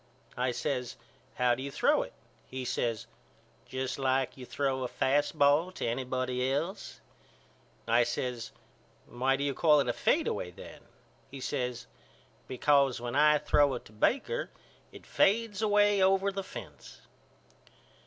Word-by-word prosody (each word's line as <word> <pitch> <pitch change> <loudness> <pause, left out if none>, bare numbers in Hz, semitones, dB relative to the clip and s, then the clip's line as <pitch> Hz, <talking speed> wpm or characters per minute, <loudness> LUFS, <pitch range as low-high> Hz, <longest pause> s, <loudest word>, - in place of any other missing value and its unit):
I 125 +1 0
says 125 -1 -3 0.4
How 125 -1 +3
do 130 - -4
you 140 - -4
throw - - +2
it? - - -7 0.3
He 130 0 -6
says 115 -2 -2 0.6
Just 130 +1 -4
like 130 -1 0
you 125 -2 -10
throw 135 -2 -1
a 125 - -1
fast 145 +5 0
ball 145 +5 +4
to - - -4
anybody 130 +1 -1
else. 165 +8 -4 0.9
I 120 +1 +4
says 120 0 -3 0.5
Why 130 +2 0
do 140 - -3
you 140 -1 0
call 150 0 +4
it 140 - 0
a 120 - +1
fadeaway 90 - 0
then? 90 - -12 0.5
He 135 - -9
says 125 -2 -3 0.6
Because 135 0 +2
when 120 +1 -5
I 150 +1 +5
throw 145 -2 +2
it 120 - -8
to - - -15
Baker 275 - 0 0.4
it - - -13
fades 215 0 +1
away 205 -1 +3
over 195 +1 +3
the 195 0 -4
fence. - - -11
135 Hz, 145 wpm, -30 LUFS, 125-150 Hz, 0.9 s, I